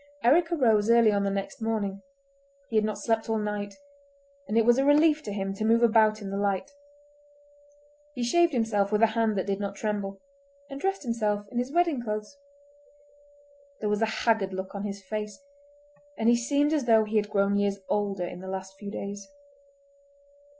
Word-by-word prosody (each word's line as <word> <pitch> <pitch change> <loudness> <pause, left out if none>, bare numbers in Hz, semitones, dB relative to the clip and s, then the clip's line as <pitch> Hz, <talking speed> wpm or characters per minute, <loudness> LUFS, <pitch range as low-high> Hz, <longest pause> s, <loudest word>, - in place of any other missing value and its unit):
Eric 325 +8 +4
arose 225 -9 +3
early 230 -2 +6
on 200 -1 +1
the - - +1
next 195 +2 -4
morning—he 280 +6 -6
had 215 - +4
not 215 -1 -2
slept 225 +2 -1
all 225 - +1
night, 210 -1 -3 0.7
and 220 - -1
it 225 - +4
was 240 +2 +4
a - - +3
relief 300 +2 +4
to 210 - -6
him 195 -1 -3
to 195 - -5
move 230 +2 +3
about 215 -2 +4
in 195 - -5
the 195 - -2
light. 200 +5 -1 1.4
He 245 - -3
shaved 340 +8 +3
himself 220 -5 0
with 210 +1 +2
a 220 -1 +4
hand 225 -2 +1
that 190 - -1
did 195 0 -2
not 200 -1 -4
tremble, 200 -2 -3 0.5
and 275 0 -7
dressed 390 -1 -1
himself 215 -4 -1
in 240 - -2
his 250 +2 -3
wedding 335 -5 +1
clothes. 215 +2 -5 1.4
There 210 - -2
was 210 +1 0
a 225 - +3 0.2
haggard 215 -5 +2
look 190 0 -6
on 200 0 -5
his 200 -1 -6
face, 210 +1 -5 0.8
and 225 - 0
he 240 - +6
seemed 285 +5 +1
as 295 -5 0
though 225 -2 +5
he 215 +1 -1
had 210 -1 0
grown 200 0 +1
years 200 0 +1
older 200 -3 -1
in 175 - -7
the 190 - -9
last 190 0 -6
few 205 - -7
days. 200 -1 -6
215 Hz, 190 wpm, -27 LUFS, 200-240 Hz, 1.4 s, early